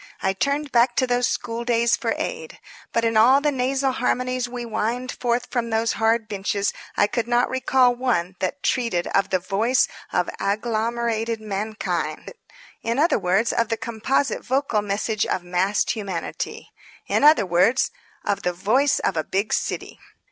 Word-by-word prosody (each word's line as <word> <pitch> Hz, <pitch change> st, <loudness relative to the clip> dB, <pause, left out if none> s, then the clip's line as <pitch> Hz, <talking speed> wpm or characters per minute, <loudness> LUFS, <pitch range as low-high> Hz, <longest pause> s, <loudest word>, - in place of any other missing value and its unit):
I 190 Hz, -, 0 dB
turned 280 Hz, +7 st, -1 dB
back 240 Hz, +1 st, +3 dB
to 255 Hz, -, +3 dB
those 245 Hz, -1 st, +1 dB
school 230 Hz, 0 st, -3 dB
days 235 Hz, 0 st, +2 dB
for -, -, -2 dB
aid. 480 Hz, 0 st, -5 dB, 0.3 s
But 230 Hz, 0 st, +1 dB
in 225 Hz, -1 st, +1 dB
all 245 Hz, +5 st, +6 dB
the 295 Hz, +1 st, +1 dB
nasal 265 Hz, +1 st, 0 dB
harmonies 255 Hz, 0 st, -1 dB
we 245 Hz, 0 st, -5 dB
whined 235 Hz, +2 st, -2 dB
forth 240 Hz, 0 st, -1 dB
from 235 Hz, -2 st, -1 dB
those 225 Hz, 0 st, +1 dB
hard 225 Hz, 0 st, +1 dB
benches 200 Hz, 0 st, -1 dB, 0.2 s
I -, -, +5 dB
could 235 Hz, +2 st, -2 dB
not 240 Hz, 0 st, +2 dB
recall 260 Hz, -1 st, +3 dB
one 230 Hz, -8 st, -1 dB
that 190 Hz, +9 st, -3 dB
treated 230 Hz, -9 st, 0 dB
of 195 Hz, -, +1 dB
the 185 Hz, -, +2 dB
voice 210 Hz, +8 st, +1 dB, 0.2 s
of -, -, +1 dB
agglomerated 225 Hz, +1 st, -1 dB
mankind. 215 Hz, -, -3 dB, 0.5 s
In 230 Hz, +2 st, -1 dB
other 320 Hz, +5 st, +3 dB
words, 195 Hz, +6 st, +1 dB
of 230 Hz, -1 st, +1 dB
the 225 Hz, -, 0 dB
composite 235 Hz, +5 st, -1 dB
vocal 260 Hz, -5 st, 0 dB
message 205 Hz, +1 st, -1 dB
of 180 Hz, -, -1 dB
massed 180 Hz, +3 st, +1 dB
humanity. 195 Hz, -6 st, -5 dB, 0.3 s
In -, -, 0 dB
other 295 Hz, -8 st, +6 dB
words, 185 Hz, +9 st, +3 dB, 0.3 s
of 200 Hz, -, 0 dB
the 180 Hz, -, -1 dB
Voice 255 Hz, +11 st, +2 dB
of 190 Hz, -, -1 dB
a 155 Hz, -, 0 dB
Big 200 Hz, +6 st, -1 dB
City. -, -, -3 dB
230 Hz, 165 wpm, -23 LUFS, 205-250 Hz, 0.5 s, all